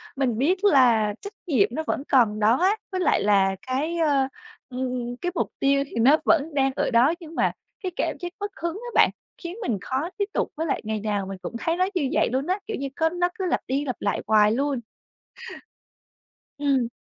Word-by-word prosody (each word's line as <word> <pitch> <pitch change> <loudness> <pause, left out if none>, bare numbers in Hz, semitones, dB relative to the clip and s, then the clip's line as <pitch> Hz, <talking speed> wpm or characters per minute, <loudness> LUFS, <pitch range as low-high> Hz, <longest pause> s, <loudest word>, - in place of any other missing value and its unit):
mình 255 -5 0
biết 365 - +1
là 235 - +4
trách 405 - -8
nhiệm 355 +7 +3
nó 315 - -3
vẫn 275 - -1
còn 220 -5 +3
đó 220 +4 +4
á, 380 +4 +3 0.2
với 370 - -2
lại 355 - +2
là 195 -2 +3
cái, 295 +7 -1
ơ, 285 -5 +2 0.4
ừm, 250 -1 -3
cái 355 0 -1
mục - - 0
tiêu 275 0 +3
thì - - -12
nó 275 +7 +6
vẫn 315 -1 +2
đang 270 -1 +2
ở - - 0
đó. 245 +7 +4
Nhưng 330 -2 -11
mà - - +2 0.3
cái 370 - -2
cảm - - -1
giác 350 -1 -6
mất 410 0 -4
hứng 335 0 -1
á 480 +5 -7
bạn, - - +6 0.3
khiến 345 +2 -5
mình 235 - -1
khó 270 - -2
tiếp 405 - +1
tục, - - 0
với 320 - -1
lại - - -1
ngày 215 -1 -2
nào 205 -2 -2
mình 195 -1 -6
cũng 210 - -6
thấy 335 +1 -1
nó 370 - +3
như 285 -7 +1
vậy - - +2
luôn 270 +4 -1
á, 375 +3 0
kiểu 445 - -3
như, 275 - -3
có 320 0 +2
nó 355 +1 0
cứ 375 - -1
lặp - - +1
đi 275 +3 -1
lặp 255 - -2
lại 200 - -1
hoài 210 -1 +5
luôn. 275 +2 0 1.8
Ừm. 270 -5 +1
275 Hz, 220 wpm, -24 LUFS, 240-340 Hz, 1.8 s, nó